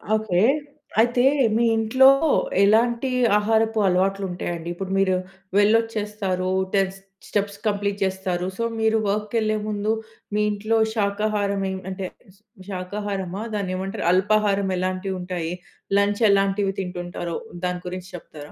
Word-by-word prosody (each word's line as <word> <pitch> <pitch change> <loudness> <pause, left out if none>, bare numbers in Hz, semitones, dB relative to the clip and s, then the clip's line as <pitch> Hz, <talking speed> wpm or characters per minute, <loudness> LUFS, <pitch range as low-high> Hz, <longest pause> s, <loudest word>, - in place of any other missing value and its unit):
Okay. 215 -5 +1 0.6
అయితే, 240 +2 +3 0.3
మీ 230 - +3
ఇంట్లో 225 +4 +5 0.6
ఎలాంటి 235 +5 +3 0.3
ఆహారపు 220 +1 +1
అలవాట్లు 195 +2 +1
ఉంటాయండి? 170 -1 -4
ఇప్పుడు 190 +2 -6
మీరు 190 -1 +3 0.4
వెళ్ళొచ్చేస్తారు. 210 -3 +1 0.3
10 195 -1 +2 0.3
స్టెప్స్ 200 -1 -1
కంప్లీట్ 200 -1 0
చేస్తారు. 190 -2 -1
సో, 230 - -1 0.2
మీరు 220 0 +3
వర్క్‌కి 210 +2 -2
వెళ్ళే 215 -1 +1
ముందు, 210 0 -1 0.4
మీ 210 - +2
ఇంట్లో 215 +2 0 0.2
శాకాహారం 205 -1 0
మెం 190 0 -2
అంటే, 190 0 -4 0.6
శాకాహారమా? 195 0 -4
దాన్ని 195 -3 -2
ఏమంటారు? 195 +2 -4
అల్పాహారం 200 0 +2
ఎలాంటివి 185 +1 -2
ఉంటాయి? 175 -2 -3 0.5
లంచ్ 205 +2 +1
ఎలాంటివి 195 0 +2
తింటుంటారో, 175 -2 -4 0.3
దాని 180 0 -2
గురించి 185 +1 -6
చెప్తారా? 150 -3 -11
200 Hz, 120 wpm, -23 LUFS, 185-215 Hz, 0.6 s, ఇంట్లో